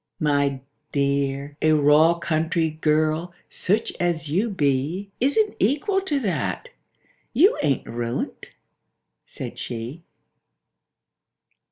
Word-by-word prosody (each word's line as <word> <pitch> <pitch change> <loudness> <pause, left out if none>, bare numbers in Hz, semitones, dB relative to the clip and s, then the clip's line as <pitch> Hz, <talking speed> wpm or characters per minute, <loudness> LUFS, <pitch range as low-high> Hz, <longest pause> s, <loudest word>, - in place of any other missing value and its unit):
— - - -52
"My 140 -3 +1 0.3
dear—a 140 +2 0
raw 150 +3 +5
country 160 -1 0
girl, 155 +2 0 0.2
such 205 +4 0
as 170 -3 0
you 195 +10 +1
be, 160 +3 -1
Isn't 410 - +2
equal 300 - +1
to 305 -7 -1
that. 225 - -2 0.6
You 340 - +5
ain't 140 -3 0
ruined," 115 +1 -4 0.8
said - - -7
she. 120 +7 -5
155 Hz, 95 wpm, -24 LUFS, 140-195 Hz, 0.8 s, raw